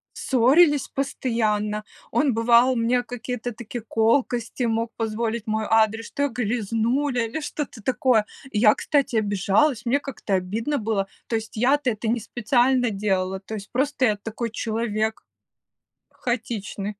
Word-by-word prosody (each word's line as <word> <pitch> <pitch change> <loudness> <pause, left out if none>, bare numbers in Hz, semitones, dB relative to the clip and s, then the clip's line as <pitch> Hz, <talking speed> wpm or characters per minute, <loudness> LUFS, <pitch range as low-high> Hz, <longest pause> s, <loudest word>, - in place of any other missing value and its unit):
Ссорились 280 +4 +4
постоянно, 215 -6 -1 0.3
он 285 -5 +2
бывал 235 +3 +4
мне 240 +2 +2
какие-то 245 0 -5
такие 240 +1 -7
колкости 230 +2 0
мог 230 0 0
позволить 225 0 -2
в - - -41
мой 220 0 -1
адрес, 225 0 +2
что 285 - -2
я 285 - +2
грязнуля 235 +3 0
или 280 +8 -4
что-то 290 -6 -5
такое. 245 -2 +2 0.3
Я, 215 0 +5
кстати, 280 -5 0
обижалась, 215 +5 +2
мне 270 +4 +2
как-то 265 -7 -5
обидно 220 +10 -1
было, 205 -3 -1 0.2
то 230 - -1
есть, 220 0 -8
я-то 260 +3 +2
это 220 +1 -4
не 235 0 +1
специально 245 +2 +1
делала, 190 -2 -1
то 200 +3 -10
есть, 200 -2 -7
просто 270 +1 +1
я 210 -2 +3
такой 225 +3 -4
человек 220 -1 -2 0.9
хаотичный. 225 -4 -4
230 Hz, 140 wpm, -24 LUFS, 215-250 Hz, 0.9 s, Я